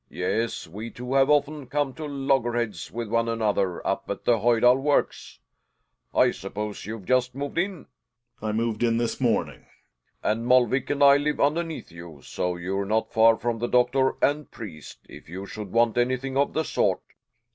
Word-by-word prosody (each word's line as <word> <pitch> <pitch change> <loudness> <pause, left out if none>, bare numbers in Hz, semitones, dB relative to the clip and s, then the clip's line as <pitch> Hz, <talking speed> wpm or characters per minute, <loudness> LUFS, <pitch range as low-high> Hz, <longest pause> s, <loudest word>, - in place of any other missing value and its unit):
Yes, 115 +1 -2
we 105 +8 -7
two 125 +2 -6
have 135 0 +4
often 145 -1 +1
come 140 +1 -1
to 155 +1 -6
loggerheads 120 - -1
with 115 0 -4
one 115 +1 +1
another 105 -5 -1
up - - -2
at - - -4
the 120 -2 +3
Hojdal 120 +2 +4
Works. 145 0 0 0.7
I - - +4
suppose 105 +1 -6
you've 110 -3 -6
just 125 +1 +1
moved 145 +4 -3
in? 190 -2 -2 0.6
Gkegers. 110 - -3
I - - 0
moved 110 0 -1
in 115 -1 +2
this 120 +2 -2
morning. 115 -4 -1 0.6
Helling. 110 +1 +1
And 115 - -5
Molvik 125 +1 +3
and 145 0 +1
I 140 0 +8
live 150 +1 -1
underneath 160 - -1
you, 85 -3 -11
so 90 0 -3
you're 95 +3 -2
not 110 +2 -1
far 115 0 +5
from 120 -1 -2
the 120 - -1
doctor 125 +2 +2
and 150 +1 +1
priest, 90 -10 -10
if - - -13
you 95 +3 -6
should 105 -1 -8
want 120 0 +2
anything 130 +2 -1
of 140 +1 +1
the 160 - 0
sort. - - 0
120 Hz, 180 wpm, -25 LUFS, 110-135 Hz, 0.7 s, I